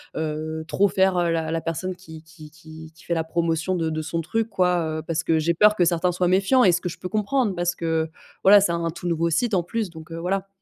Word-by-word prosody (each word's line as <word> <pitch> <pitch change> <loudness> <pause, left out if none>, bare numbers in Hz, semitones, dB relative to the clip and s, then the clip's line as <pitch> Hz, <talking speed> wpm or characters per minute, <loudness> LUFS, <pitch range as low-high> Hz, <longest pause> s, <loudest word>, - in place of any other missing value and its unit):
heu, 155 0 -3
trop 200 +4 +2
faire 190 0 +2 0.2
la 160 -1 -1
la 165 0 -1
personne 165 +3 -3
qui 160 -3 -12
qui 160 -1 -14
qui 160 0 -13
qui 170 - -18
fait 170 - -2
la 165 - 0
promotion 165 +2 -1
de 165 -2 -1
de 155 0 -3
son 165 +2 -3
truc, 225 +7 -2
quoi, 180 -5 0
heu, - - -5
parce 160 0 -2
que 160 -1 +2
j'ai 165 +2 +1
peur 210 +4 +5
que 180 - +3
certains 175 +1 +1
soient 180 +1 0
méfiants? 195 +8 +3
Et 185 - +6
ce 175 0 0
que 180 - -3
je - - -10
peux 180 - -6
comprendre, 215 +1 0
parce 175 0 0
que 160 -1 -1 0.3
voilà, 200 +1 +8
c'est 195 - +1
un 170 0 -2
un - - 0
tout 175 +2 -7
nouveau 170 0 0
site 235 +7 0
en 180 - +1
plus, 215 +3 -3
donc 160 -1 -12
heu, 165 - -6
voilà. 190 +3 -2
170 Hz, 265 wpm, -23 LUFS, 160-185 Hz, 0.3 s, voilà